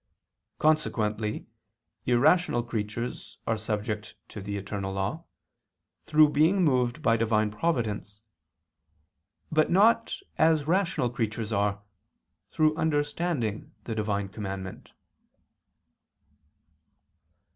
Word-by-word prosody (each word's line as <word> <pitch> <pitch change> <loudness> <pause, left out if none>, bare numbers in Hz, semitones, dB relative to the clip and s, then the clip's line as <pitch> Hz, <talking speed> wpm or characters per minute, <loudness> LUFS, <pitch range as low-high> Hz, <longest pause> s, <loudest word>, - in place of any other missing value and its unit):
Consequently 110 -9 0 0.6
irrational 125 +1 +3
creatures 115 +1 -5
are 115 - +1
subject 105 0 -4
to 105 - -8
the 100 +1 -4
eternal 100 -1 -4
law, 100 - -3 0.8
through 155 -1 +5
being 165 +6 +3
moved 125 -2 +1
by 115 -4 +4
Divine 110 -2 +1
providence; 105 -6 -2 1.3
but 155 -1 +3
not, 225 +5 +4 0.2
as 160 -2 +4
rational 170 -8 +1
creatures 110 -2 -2
are, 100 0 0 0.7
through 155 0 +2
understanding 145 -7 -1
the 115 - -4
Divine 105 -2 -1
commandment. 95 -2 -6
115 Hz, 90 wpm, -28 LUFS, 105-155 Hz, 1.3 s, through